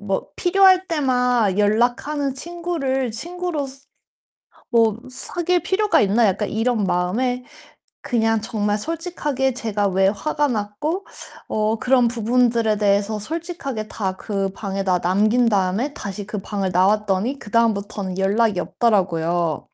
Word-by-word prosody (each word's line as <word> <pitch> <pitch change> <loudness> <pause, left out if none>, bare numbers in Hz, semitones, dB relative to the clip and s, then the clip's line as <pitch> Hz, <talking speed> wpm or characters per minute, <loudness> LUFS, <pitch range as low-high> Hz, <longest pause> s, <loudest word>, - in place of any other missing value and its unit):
뭐 195 -2 -2
'필요할 375 0 +4
때만 250 - +1
연락하는 245 +7 +1
친구를 290 -5 -2
친구로서 305 +1 -4 0.9
뭐 225 -2 +3
사귈 350 +7 -1
필요가 415 +2 +2
있나?' 215 +3 +3
약간 200 +2 0
이런 225 -1 0
마음에 235 +9 0 0.6
그냥 225 -5 +1
정말 210 -1 -1
솔직하게 295 - -2
제가 215 -5 -1
왜 190 0 +2
화가 295 +8 0
났고 240 - -2 0.4
어 215 +1 0
그런 250 -2 +3
부분들에 230 -1 +1
대해서 205 +1 +1
솔직하게 275 - -5
다 190 -4 -3
그 195 -1 -2
방에다 195 -3 -1
남긴 215 +7 +2
다음에 205 +7 0
다시 200 0 -6
그 215 - -4
방을 195 -1 -3
나왔더니 205 +6 +1
그다음부터는 205 -3 -1
연락이 205 0 +2
없더라고요. 175 - 0
225 Hz, 285 characters per minute, -21 LUFS, 200-270 Hz, 0.9 s, 필요할